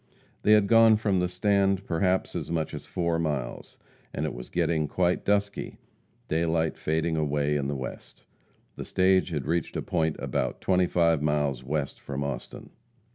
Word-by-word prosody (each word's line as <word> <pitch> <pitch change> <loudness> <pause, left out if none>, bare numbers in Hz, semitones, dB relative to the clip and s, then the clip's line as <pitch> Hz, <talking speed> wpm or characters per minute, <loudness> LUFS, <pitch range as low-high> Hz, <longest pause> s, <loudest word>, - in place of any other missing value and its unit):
They 105 - +5
had 105 -2 +5
gone 115 +1 +6
from 100 -4 +1
"the 90 - +1
stand" 100 +1 +1
perhaps 90 +2 0
as - - -4
much 80 -2 -2
as - - -7
four 85 -2 -1
miles, 75 -7 -3 0.4
and - - -1
it - - -3
was - - -9
getting 80 -2 0
quite 90 +4 0
dusky 100 0 -1 0.5
daylight 80 0 0
fading 80 +1 -1
away 75 -1 0
in 70 -2 -1
the 70 - -2
west. 65 -2 -8 0.5
The - - -5
stage 95 0 +2
had 75 -5 -3
reached 85 +2 -1
a - - -1
point 80 -3 0
about - - -2
twenty 90 -1 +2
five 85 -4 +2
miles 75 -4 0
west 70 +1 -3
from 70 0 -4
Austin. 70 -2 -6
80 Hz, 170 wpm, -27 LUFS, 75-95 Hz, 0.5 s, gone